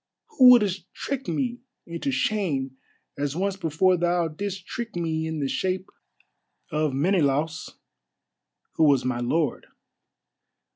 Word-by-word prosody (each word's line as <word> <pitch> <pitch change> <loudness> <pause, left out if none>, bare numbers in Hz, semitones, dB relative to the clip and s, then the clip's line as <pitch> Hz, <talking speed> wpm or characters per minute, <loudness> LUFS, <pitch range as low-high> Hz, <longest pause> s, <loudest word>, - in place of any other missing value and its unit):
who 260 - +7
wouldest 200 -7 +4
trick 270 -1 -4
me 245 -3 -2 0.3
into 170 -4 -4
shame 135 -3 -1 0.4
as 145 0 -1
once 195 +2 -1
before 180 +1 +2
thou 175 0 +1
didst 190 +4 -5
trick 235 -2 -6
me 160 -2 -1
in 160 0 -3
the 140 - -1
shape 185 +6 -2 0.8
of 155 -1 0
Menelaus, 155 0 0 1.0
who 160 - +5
was 140 -4 +3
my 130 -1 -1
lord. 140 +3 -1
170 Hz, 125 wpm, -25 LUFS, 145-195 Hz, 1.0 s, who